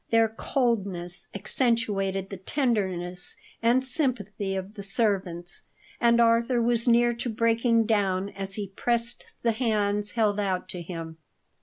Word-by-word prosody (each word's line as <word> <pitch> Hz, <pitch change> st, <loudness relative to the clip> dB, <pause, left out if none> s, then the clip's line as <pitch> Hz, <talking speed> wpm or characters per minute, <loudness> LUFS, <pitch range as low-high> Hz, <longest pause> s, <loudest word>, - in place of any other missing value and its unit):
Their 225 Hz, -1 st, +4 dB
coldness 200 Hz, -8 st, -2 dB
accentuated 200 Hz, -3 st, 0 dB
the 195 Hz, -, -5 dB
tenderness 190 Hz, -, -1 dB, 0.3 s
and 240 Hz, +3 st, +3 dB
sympathy 210 Hz, -, -1 dB
of 190 Hz, +2 st, -5 dB
the 210 Hz, -, -8 dB
servants, 195 Hz, -5 st, -1 dB, 0.4 s
and 235 Hz, 0 st, +4 dB
Arthur 235 Hz, +1 st, +4 dB
was 235 Hz, 0 st, +2 dB
near 240 Hz, 0 st, +5 dB
to 240 Hz, +1 st, -4 dB
breaking 230 Hz, +1 st, +2 dB
down 200 Hz, -3 st, +1 dB
as 195 Hz, 0 st, -4 dB
he 205 Hz, -3 st, -4 dB
pressed 235 Hz, -1 st, -1 dB, 0.2 s
the 230 Hz, -, +3 dB
hands 210 Hz, -3 st, 0 dB
held 210 Hz, -2 st, +2 dB
out 190 Hz, -3 st, -1 dB
to 180 Hz, -, -4 dB
him. 165 Hz, -2 st, -7 dB
210 Hz, 135 wpm, -27 LUFS, 190-235 Hz, 0.4 s, near